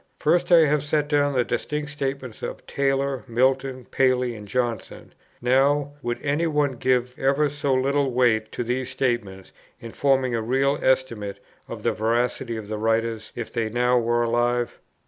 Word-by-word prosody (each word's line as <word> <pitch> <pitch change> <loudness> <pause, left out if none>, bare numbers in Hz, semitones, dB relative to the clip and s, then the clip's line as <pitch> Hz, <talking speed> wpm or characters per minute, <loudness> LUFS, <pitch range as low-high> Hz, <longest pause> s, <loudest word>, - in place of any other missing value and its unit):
First, 175 +3 +1
I 170 -1 +8
have 150 0 +2
set 145 0 0
down 145 -1 +2
the 125 -2 +2
distinct 150 +4 -3
statements 135 -4 -4
of - - -6
Taylor, 135 -1 -1
Milton, 130 +1 0
Paley, 125 -2 +1
and 105 -2 -10
Johnson: 120 -2 -3 0.3
now, 140 +3 +3
would 120 -2 -3
any 150 +4 +1
one 150 -3 +1
give 125 0 0
ever 140 +2 +2
so 145 -2 0
little 140 +1 +1
weight 120 -3 +2
to - - -2
these 125 +2 -2
statements, 120 -8 -2 0.3
in 115 - -9
forming 135 -2 +1
a 115 - 0
real 135 +5 +1
estimate 115 -7 0 0.3
of - - -8
the - - +2
veracity 115 +2 -1
of 110 -2 -7
the 105 0 -4
writers, 115 0 -1
if 120 -2 -6
they 115 -2 -1
now 125 +2 +2
were 120 0 +1
alive? 120 +1 0
130 Hz, 165 wpm, -24 LUFS, 120-140 Hz, 0.3 s, I